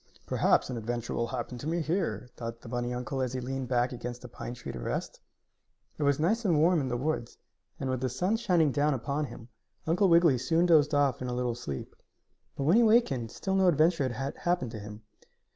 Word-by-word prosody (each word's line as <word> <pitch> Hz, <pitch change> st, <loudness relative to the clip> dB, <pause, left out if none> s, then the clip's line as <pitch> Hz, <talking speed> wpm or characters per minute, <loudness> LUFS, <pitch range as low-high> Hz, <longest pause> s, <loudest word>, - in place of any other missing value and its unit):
"Perhaps -, -, +2 dB
an 125 Hz, -, -3 dB
adventure 120 Hz, +1 st, -3 dB
will 115 Hz, -, -1 dB
happen 125 Hz, 0 st, -5 dB
to 140 Hz, -, -6 dB
me 170 Hz, +2 st, 0 dB
here," 155 Hz, -, -1 dB
thought 115 Hz, 0 st, -6 dB
the -, -, -12 dB
bunny 120 Hz, +1 st, -2 dB
uncle 125 Hz, +2 st, -3 dB
as 130 Hz, -1 st, -1 dB
he 130 Hz, -, -2 dB
leaned 130 Hz, +1 st, -4 dB
back 125 Hz, 0 st, +1 dB
against 125 Hz, 0 st, -6 dB
a -, -, -6 dB
pine 120 Hz, 0 st, -7 dB
tree 120 Hz, -, -7 dB
to 65 Hz, -, -7 dB
rest. -, -, -4 dB, 0.8 s
It -, -, -4 dB
was 140 Hz, -1 st, +2 dB
nice 215 Hz, +9 st, +1 dB
and 175 Hz, -7 st, +3 dB
warm 170 Hz, +1 st, +4 dB
in 135 Hz, -, -2 dB
the 120 Hz, -1 st, -1 dB
woods, 140 Hz, -2 st, -2 dB, 0.4 s
and, 135 Hz, -, -3 dB
with 130 Hz, -1 st, -1 dB
the 130 Hz, -, 0 dB
sun 180 Hz, -, 0 dB
shining 175 Hz, -9 st, +2 dB
down 145 Hz, +1 st, +2 dB
upon 140 Hz, +4 st, -2 dB
him, 120 Hz, -2 st, -11 dB, 0.4 s
Uncle 180 Hz, +4 st, +3 dB
Wiggily 165 Hz, -6 st, +5 dB
soon 165 Hz, +7 st, +2 dB
dozed 155 Hz, -3 st, +4 dB
off 140 Hz, -4 st, +2 dB
in 130 Hz, -, -3 dB
a 125 Hz, -, -2 dB
little 125 Hz, -1 st, -1 dB
sleep. 70 Hz, -, -6 dB, 0.6 s
But 140 Hz, -, -3 dB
when 165 Hz, +10 st, +4 dB
he -, -, +6 dB
awakened 215 Hz, -, +3 dB
still 190 Hz, -, -3 dB
no 190 Hz, -1 st, +4 dB
adventure 160 Hz, -3 st, +3 dB
had 135 Hz, +4 st, -4 dB
happened 175 Hz, -9 st, -1 dB
to 110 Hz, -, -6 dB
him. 105 Hz, +1 st, -9 dB
130 Hz, 225 wpm, -29 LUFS, 120-165 Hz, 0.8 s, he